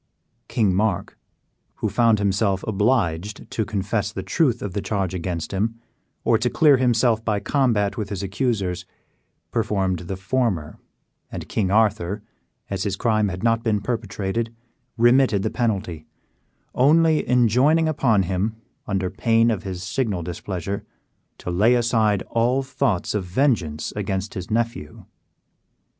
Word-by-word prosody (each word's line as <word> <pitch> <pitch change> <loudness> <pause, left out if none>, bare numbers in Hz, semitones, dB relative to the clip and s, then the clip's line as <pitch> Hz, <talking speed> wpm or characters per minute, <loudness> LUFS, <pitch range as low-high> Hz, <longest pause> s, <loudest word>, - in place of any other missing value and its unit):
King 105 -5 +1
Mark, 100 -1 0 0.6
who - - -2
found 115 +2 +3
himself 100 -1 +1
obliged 105 -3 0
to 110 - 0
confess 100 0 -2
the - - -5
truth 130 -8 +1
of 100 -3 -4
the 100 - -2
charge 95 -2 -2
against 85 -2 -3
him, 115 +4 -1 0.4
or 115 - +3
to 125 +2 +1
clear 145 -1 +5
himself 120 -2 +2
by 105 -3 0
combat 115 -6 +1
with 105 -3 -3
his 100 -1 -4
accusers, 95 -4 -2 0.6
preferred 100 -6 0
the 95 - -3
former, 95 -6 -1 0.5
and - - -6
King 100 -4 0
Arthur, 105 -1 +1 0.4
as 100 -2 -3
his 100 -1 -1
crime 110 -1 +1
had 95 0 -5
not 115 -1 +2
been 110 -3 +1
perpetrated, 110 0 -3 0.5
remitted 120 -3 +4
the - - -1
penalty, 100 -9 -2 0.7
only 155 +4 +4
enjoining 125 +7 +4
upon 120 -10 +2
him, 95 +5 -1 0.3
under 95 -2 -1
pain 115 0 +3
of 110 - -2
his 95 -2 -6
signal 100 -2 -1
displeasure, 90 +2 -4 0.5
to 90 - -5
lay 105 +8 +4
aside 110 -4 +2
all 125 +4 +2
thoughts 130 -7 -1
of 105 -2 -1
vengeance 90 - 0
against 100 0 -3
his 95 -3 -6
nephew. 115 -9 -2
105 Hz, 140 wpm, -23 LUFS, 95-115 Hz, 0.7 s, clear